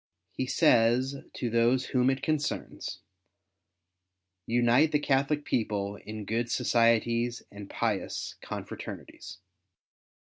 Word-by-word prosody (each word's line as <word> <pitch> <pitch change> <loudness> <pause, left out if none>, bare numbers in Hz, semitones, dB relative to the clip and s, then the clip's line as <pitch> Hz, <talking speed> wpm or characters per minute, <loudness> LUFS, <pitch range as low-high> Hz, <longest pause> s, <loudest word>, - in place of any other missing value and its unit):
He 130 - -3
says 120 +3 +3 0.2
to 120 - -3
those 120 +3 +3
whom 125 0 +4
it 135 0 -1
concerns, 155 -2 -3 0.7
" 90 +1 -56
unite 120 +6 +4
the 150 - +4
Catholic 145 +1 +1
people 100 -3 -1
in 105 0 -8
good 115 +3 -1
societies 115 +1 +2
and 100 -1 -10
pious - - -2
confraternities." - - -8
115 Hz, 105 wpm, -29 LUFS, 105-130 Hz, 0.7 s, whom